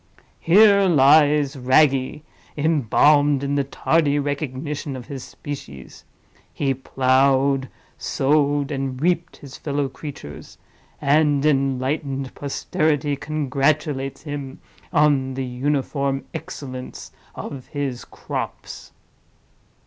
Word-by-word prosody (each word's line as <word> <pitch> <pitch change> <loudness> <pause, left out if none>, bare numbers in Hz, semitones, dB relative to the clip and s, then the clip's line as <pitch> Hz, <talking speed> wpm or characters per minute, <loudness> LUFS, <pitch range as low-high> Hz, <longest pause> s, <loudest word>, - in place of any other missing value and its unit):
Here 200 +3 +6
lies 145 -2 +4
Wragge, 135 +2 +2 0.4
embalmed 145 -1 +3
in 140 0 -1
the 140 -1 +1
tardy 145 +1 +1
recognition 145 0 -3
of 125 -2 -8
his 135 -3 -7
species: 70 - -9 0.5
he 135 -2 0
plowed, 135 +1 +2 0.3
sowed, 145 0 +1
and 135 -2 -3
reaped 170 +2 0
his 135 -2 -11
fellow 145 -1 -2
creatures; 135 - -10 0.4
and 145 0 +2
enlightened 135 -1 0
posterity 145 +1 -1
congratulates 140 -1 -1
him 145 -3 -6 0.3
on 145 -5 +2
the 135 0 -3
uniform 135 +1 -1
excellence 130 -2 -7 0.2
of 135 -3 -7
his 140 -4 -4
crops." - - -7
140 Hz, 95 wpm, -22 LUFS, 135-150 Hz, 0.5 s, Here